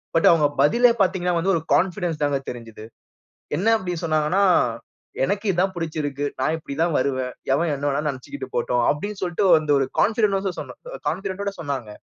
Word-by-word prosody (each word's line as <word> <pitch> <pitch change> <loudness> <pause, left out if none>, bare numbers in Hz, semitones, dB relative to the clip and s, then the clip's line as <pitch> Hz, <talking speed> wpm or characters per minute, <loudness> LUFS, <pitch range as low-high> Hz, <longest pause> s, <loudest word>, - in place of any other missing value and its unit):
But 165 - +5
அவங்க 155 -3 +4
பதிலே 235 - +5
பார்த்தீங்கனா 180 -2 +1
வந்து 190 +4 +1
ஒரு 165 - -1
கான்ஃபிடன்ஸ் 175 -3 0
தாங்க 145 -1 +1
தெரிஞ்சிது, 115 -3 -9 0.7
என்ன 195 - -1
அப்படி 185 -4 -4
சொன்னாங்கனா, 155 +3 +1 0.8
"எனக்கு 200 +9 -2
இதான் 185 +1 0
பிடிச்சிருக்கு, 150 -4 -3 0.2
நான் 155 +4 +1
இப்படி 145 -3 -8
தான் 170 -3 0
வருவேன், 130 -1 -1 0.2
எவன் 165 +3 +1
என்ன 140 +1 -5
வேனா 140 +1 0
நினைச்சிகிட்டு 135 0 -7
போட்டும்." 120 0 +1
அப்படினு 205 +7 -4
சொல்லிட்டு 180 +2 0
வந்து 155 -2 +1
ஒரு 135 - 0
கான்ஃபிடன்ட்ஸ் 200 -4 +1 0.5
கான்ஃபிடன்ட் 190 +4 -4
ஓட 200 - -2
சொன்னாங்க, 135 -7 -4
165 Hz, 160 wpm, -23 LUFS, 140-190 Hz, 0.8 s, But